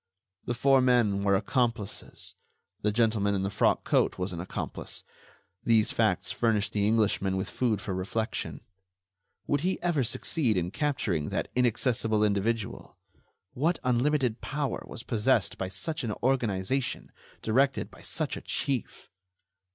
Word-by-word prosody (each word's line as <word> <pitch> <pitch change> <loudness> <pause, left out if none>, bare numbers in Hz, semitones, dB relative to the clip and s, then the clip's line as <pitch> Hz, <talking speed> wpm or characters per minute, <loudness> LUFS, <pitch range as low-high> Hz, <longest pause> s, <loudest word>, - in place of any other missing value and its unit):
The 120 - -1
four 135 +2 +4
men 120 -6 +3
were 100 -1 +3
accomplices. 115 -1 -2 0.5
The 105 - +2
gentleman 110 -2 +2
in 95 - -1
the 100 - -1
frock - - +2
coat - - +2
was 90 0 -2
an 85 - -5
accomplice. 90 - -5 0.6
These 110 -2 +3
facts - - +1
furnished 110 -3 +1
the 105 -1 +2
Englishman 105 -3 +2
with 95 +1 -2
food 115 -4 0
for 95 - -4
reflection. 100 +5 -3 0.8
Would 145 -1 +1
he 185 +3 0
ever 170 -6 +2
succeed 120 - 0
in 90 0 -1
capturing 105 - -1
that - - -2
inaccessible 115 -3 +2
individual? 105 +1 -1 0.6
What 160 +6 +1
unlimited 125 -1 +1
power 145 -3 -2
was - - -8
possessed 110 -4 +1
by 95 - -2
such 155 - -2
an 110 -3 -1
organization, 125 -1 0 0.3
directed 135 +5 +2
by - - -15
such - - -2
a - - -7
chief! 135 -6 -2
115 Hz, 140 wpm, -28 LUFS, 100-130 Hz, 0.8 s, four